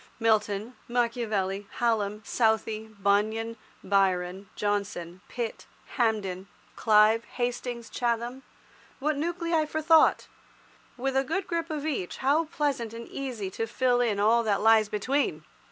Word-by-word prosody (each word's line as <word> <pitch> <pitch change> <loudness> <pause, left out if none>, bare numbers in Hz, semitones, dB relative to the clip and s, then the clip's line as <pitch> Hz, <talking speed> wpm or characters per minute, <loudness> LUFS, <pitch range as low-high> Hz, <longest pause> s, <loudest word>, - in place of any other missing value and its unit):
Milton, 215 0 +1
Machiavelli, 220 -5 -1
Hallam, 215 -3 0
Southey, 220 -1 +1
Bunyan, 215 +2 0 0.3
Byron, 190 -1 +1
Johnson, 200 -4 -2
Pitt, 235 -2 -5 0.3
Hampden, 200 -6 0 0.3
Clive, 215 +1 +4
Hastings, 245 -1 -3
Chatham—what 245 +4 -4
nuclei 335 0 0
for 315 - -2
thought! 320 0 +4 0.7
With 265 +1 -2
a 270 - +3
good 345 +8 -2
grip 335 -1 -2
of 305 -2 -3
each 260 - -3
how 290 +5 +2
pleasant 275 -7 -2
and 235 0 -8
easy 240 -8 -4
to 225 +4 -3
fill 245 +1 +2
in 220 -4 +1
all 225 +3 +4
that 210 -3 0
lies 220 -1 +5
between! 210 - 0
225 Hz, 120 wpm, -28 LUFS, 205-260 Hz, 0.7 s, lies